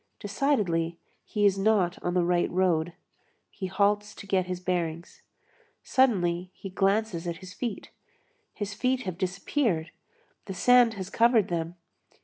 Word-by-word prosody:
Decidedly, 195 - 0 0.3
he 210 -1 0
is 195 -1 +3
not 195 -4 +2
on 175 0 -2
the 180 - +3
right 175 0 +1
road; 175 -2 +1 0.6
he 190 - -5
halts 205 +2 +1
to - - -10
get 190 -2 +1
his 180 -1 -3
bearings. 175 -2 -3 0.6
Suddenly 180 -9 +2
he 195 - -8
glances 195 -2 0
at 170 -1 -3
his 185 -1 -11
feet; 235 -2 -5 0.6
his 205 -1 -5
feet 255 +3 0
have 185 -2 -5
disappeared. 185 - -1 0.5
The 195 - -6
sand 245 +2 +5
has 190 -1 -6
covered 230 -2 +4
them. 170 0 -3
190 Hz, 140 wpm, -27 LUFS, 175-210 Hz, 0.6 s, sand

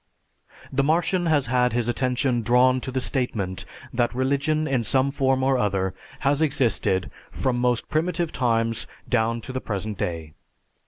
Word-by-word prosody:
The 135 - +3
Martian 170 +4 +1
has 150 -4 +3
had 125 0 +2
his 120 -1 0
attention 125 0 0
drawn 125 +3 +4
to 130 - -5
the 130 - -1
statement 115 -8 -2 0.3
that 120 0 0
religion 140 +4 +1
in 130 -3 +1
some 130 +5 +2
form 135 -2 +1
or 135 -1 +2
other 95 -3 0 0.3
has 140 +2 +2
existed 120 - +1 0.2
from 125 -2 -1
most 125 -1 +1
primitive 165 +1 0
times 115 -2 0 0.2
down 115 -1 +1
to 130 - -7
the 130 - -3
present 100 -1 -4
day. 80 -6 -3
125 Hz, 155 wpm, -24 LUFS, 115-135 Hz, 0.3 s, drawn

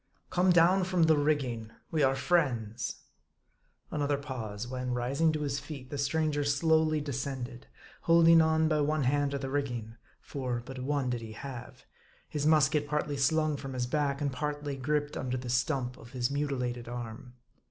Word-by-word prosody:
" - - -44
Come 180 +1 +3
down 180 +2 +5
from 180 -2 +2
the 160 -1 +5
rigging. 135 -7 0 0.2
We 155 - +1
are 135 -1 +4
friends." 125 - 0 0.9
Another 145 -1 0
pause; 120 -6 -5
when, 125 0 -3
rising 135 +7 +1
to 155 - -2
his 140 -1 -1
feet, 140 -3 -9
the 145 - -3
stranger 145 +1 +1
slowly 155 +2 +3
descended, 135 -3 -5 0.3
holding 165 0 +6
on 160 0 +3
by 155 -1 +2
one 150 0 +1
hand 145 +2 +2
to 140 - -2
the 135 -1 -5
rigging, 120 -5 -3 0.2
for 125 -4 -4
but 130 0 -7
one 135 -1 -1
did 120 -1 -2
he 110 -1 -8
have; 125 +1 -9 0.4
his 150 0 -1
musket 150 -1 +4
partly 150 -1 -1
slung 155 +2 +2
from 135 -1 -6
his 125 -1 -1
back, 140 +1 0
and 140 -2 0
partly 145 +1 -3
griped 145 +2 -1
under 130 0 -2
the 125 -1 -6
stump 125 0 0
of 120 +3 -14
his 125 0 -1
mutilated 125 -4 -2
arm. 120 0 -7
140 Hz, 175 wpm, -30 LUFS, 125-150 Hz, 0.9 s, holding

